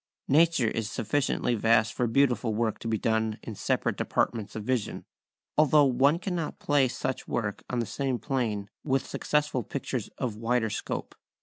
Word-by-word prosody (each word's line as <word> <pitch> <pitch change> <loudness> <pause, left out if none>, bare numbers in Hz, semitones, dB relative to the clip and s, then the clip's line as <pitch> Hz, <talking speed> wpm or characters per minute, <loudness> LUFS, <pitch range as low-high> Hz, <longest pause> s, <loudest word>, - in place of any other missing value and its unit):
Nature 160 -3 +4
is 110 -2 -2
sufficiently 125 +2 0
vast 110 -1 +3
for 125 - 0
beautiful 120 -2 +2
work 110 -1 0
to - - -6
be 110 -1 +1
done 110 0 0
in 115 - -6
separate - - 0
departments 110 -4 -1
of 110 - -4
vision, 125 -1 -2 0.5
although 150 -1 +6
one 140 +4 +4
cannot 175 -3 -3
place 140 -4 +1
such 130 - -3
work 105 -4 -2
on 125 - -2
the 120 - 0
same 135 +1 -2
plane 110 -5 -2 0.2
with 135 -2 +1
successful 150 -4 0
pictures - - -4
of 120 -4 -2
wider 115 0 0
scope. - - -4
120 Hz, 165 wpm, -28 LUFS, 110-140 Hz, 0.5 s, although